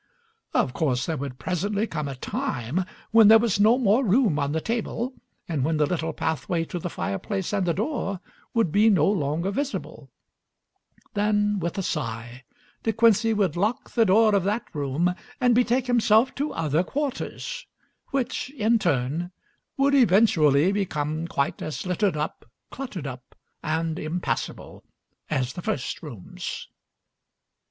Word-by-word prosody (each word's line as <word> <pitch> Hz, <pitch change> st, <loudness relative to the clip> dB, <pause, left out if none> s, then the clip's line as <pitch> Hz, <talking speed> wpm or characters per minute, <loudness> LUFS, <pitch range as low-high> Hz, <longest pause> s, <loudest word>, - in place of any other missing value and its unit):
Of 125 Hz, -, +2 dB
course 130 Hz, -3 st, 0 dB
there 160 Hz, -, -2 dB
would 135 Hz, -2 st, -5 dB
presently 200 Hz, +7 st, -1 dB
come 155 Hz, -8 st, -4 dB
a 135 Hz, -, -5 dB
time 130 Hz, +6 st, -2 dB, 0.3 s
when 225 Hz, -1 st, +7 dB
there 220 Hz, +1 st, +9 dB
was 220 Hz, -3 st, +1 dB
no 220 Hz, +4 st, +5 dB
more 235 Hz, +1 st, +3 dB
room 210 Hz, -, +3 dB
on 140 Hz, 0 st, 0 dB
the 160 Hz, -, 0 dB
table 235 Hz, +5 st, -2 dB, 0.3 s
and 155 Hz, -6 st, -1 dB
when 155 Hz, +2 st, +1 dB
the 150 Hz, -, +3 dB
little 160 Hz, +1 st, -2 dB
pathway 165 Hz, +1 st, -1 dB
to 175 Hz, -, -1 dB
the 175 Hz, -, -4 dB
fireplace 190 Hz, -, -3 dB
and 195 Hz, -3 st, 0 dB
the 170 Hz, -, +2 dB
door 210 Hz, -, -2 dB, 0.4 s
would 225 Hz, -8 st, +2 dB
be 210 Hz, +5 st, +5 dB
no 175 Hz, -8 st, +4 dB
longer 170 Hz, -1 st, 0 dB
visible; 280 Hz, +6 st, -4 dB, 1.0 s
then, 210 Hz, 0 st, +1 dB
with 170 Hz, +1 st, -3 dB
a 195 Hz, -, -1 dB
sigh, 120 Hz, -4 st, -4 dB, 0.4 s
De 225 Hz, -, +1 dB
Quincey 225 Hz, 0 st, +4 dB
would 200 Hz, -7 st, +1 dB
lock 220 Hz, +9 st, -1 dB
the 230 Hz, -, +3 dB
door 215 Hz, +2 st, +5 dB
of 200 Hz, -3 st, +3 dB
that 210 Hz, +4 st, 0 dB
room 150 Hz, +4 st, 0 dB, 0.3 s
and 250 Hz, -2 st, +4 dB
betake 245 Hz, +1 st, +2 dB
himself 235 Hz, 0 st, +3 dB
to 290 Hz, +2 st, -2 dB
other 160 Hz, 0 st, +1 dB
quarters, 295 Hz, -, -4 dB, 0.4 s
which 255 Hz, -1 st, -2 dB
in 230 Hz, -3 st, +2 dB
turn 160 Hz, +1 st, 0 dB, 0.5 s
would 275 Hz, +1 st, +3 dB
eventually 185 Hz, -, +5 dB
become 160 Hz, -5 st, -2 dB
quite 140 Hz, -4 st, -1 dB
as 155 Hz, -, -4 dB
littered 185 Hz, -2 st, 0 dB
up, 150 Hz, +1 st, -4 dB, 0.2 s
cluttered 225 Hz, -, -6 dB
up, 125 Hz, -2 st, -8 dB, 0.3 s
and 160 Hz, +1 st, -1 dB
impassable 165 Hz, +3 st, -4 dB, 0.5 s
as 130 Hz, -4 st, -1 dB
the 175 Hz, -, -6 dB
first 130 Hz, -6 st, -3 dB
rooms. 115 Hz, -, -7 dB
185 Hz, 150 wpm, -25 LUFS, 150-225 Hz, 1.0 s, there